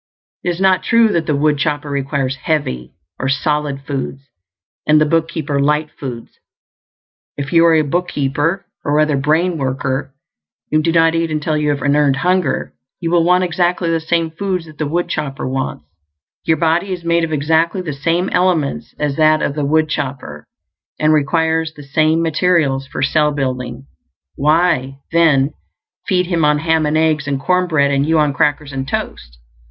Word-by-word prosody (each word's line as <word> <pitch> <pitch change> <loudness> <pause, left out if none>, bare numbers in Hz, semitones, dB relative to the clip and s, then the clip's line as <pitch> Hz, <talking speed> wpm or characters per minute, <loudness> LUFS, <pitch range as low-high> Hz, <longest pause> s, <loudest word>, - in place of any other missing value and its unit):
It 180 - -1
is 175 0 -3
not 190 -1 +3
true 230 -2 +3
that 170 -5 -1
the 150 - +1
woodchopper 150 0 0
requires 140 -1 -2
"heavy" 65 - -2 0.2
or 130 - -1
"solid" 145 +1 -1
foods 135 -1 -5 0.6
and 150 0 +5
the 155 - +3
bookkeeper 155 -2 -1
"light" 150 +2 +1
foods. 120 -4 -8 1.0
If 140 +1 -4
you 165 0 +6
are 165 - +5
a 155 - +3
bookkeeper, 150 +2 -1 0.2
or 150 0 +1
other 155 -1 +2
brain 160 +5 +1
worker, 135 0 -2 0.6
and 155 0 +2
do 165 - +1
not 165 0 +4
eat 165 0 0
until 155 0 -1
you 150 -1 0
have 140 -2 -1
an 145 0 +2
EARNED 145 -2 +3
hunger, 180 0 0 0.3
you 170 -2 -2
will 170 -1 +4
want 180 +2 +3
exactly 175 -1 0
the 165 - +1
same 165 0 -1
foods 180 +1 -3
that 155 -2 -15
the 155 - -1
woodchopper 155 -5 -2
wants. 130 - -3 0.6
Your 160 - +2
body 165 +4 +1
is 180 -2 -4
made 170 0 +2
of 165 - -2
exactly 160 +5 +1
the 160 -5 -4
same 165 +6 0
elements 160 -10 0
as 145 -2 -2
that 155 0 +4
of - - -1
the 150 0 -2
woodchopper, 140 - -2 0.5
and 155 0 +3
requires 160 +2 +1
the 145 - -11
same 155 +3 +1
materials 155 -5 +1
for 130 - -4
cell 150 +1 +2
building; 130 -2 -4 0.5
why, 150 -3 +1
then, 155 -4 +3 0.5
feed 180 -2 +2
him 170 -2 0
on 150 0 +3
ham 160 0 +1
and 150 +1 +1
eggs 155 -2 +1
and 140 -1 -1
corn 180 +5 +1
bread 140 -4 +2
and 140 +1 +1
you 160 0 +3
on 150 -2 +2
crackers 145 0 0
and 135 0 -4
toast? - - -5
155 Hz, 175 wpm, -17 LUFS, 140-165 Hz, 1.0 s, you